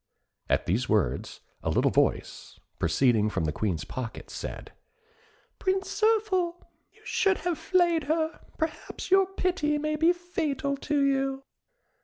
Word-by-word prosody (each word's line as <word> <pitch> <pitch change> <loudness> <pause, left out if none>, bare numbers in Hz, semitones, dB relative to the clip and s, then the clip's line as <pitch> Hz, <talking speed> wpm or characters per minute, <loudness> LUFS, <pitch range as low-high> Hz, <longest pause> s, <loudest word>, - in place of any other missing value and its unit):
At - - +2
these 115 +9 0
words, 105 -3 0 0.2
a - - -2
little - - +2
voice, - - 0 0.2
proceeding 105 +6 +3
from 80 - -1
the 75 - 0
Queen's 85 -2 -1
pocket, 125 -3 -6
said, - - -6 0.9
"Prince 385 +3 -1
Zirphil, 415 -6 +2 0.4
you - - -25
should 390 -2 +2
have 340 -1 -2
flayed 345 -1 +2
her; 315 +2 0 0.2
perhaps 320 +3 -4
your 385 0 +6
pity 360 -6 0
may 305 +1 -1
be 325 +3 +4
fatal 315 -5 -2
to 285 0 +1
you." 270 0 0
310 Hz, 135 wpm, -28 LUFS, -, 0.9 s, your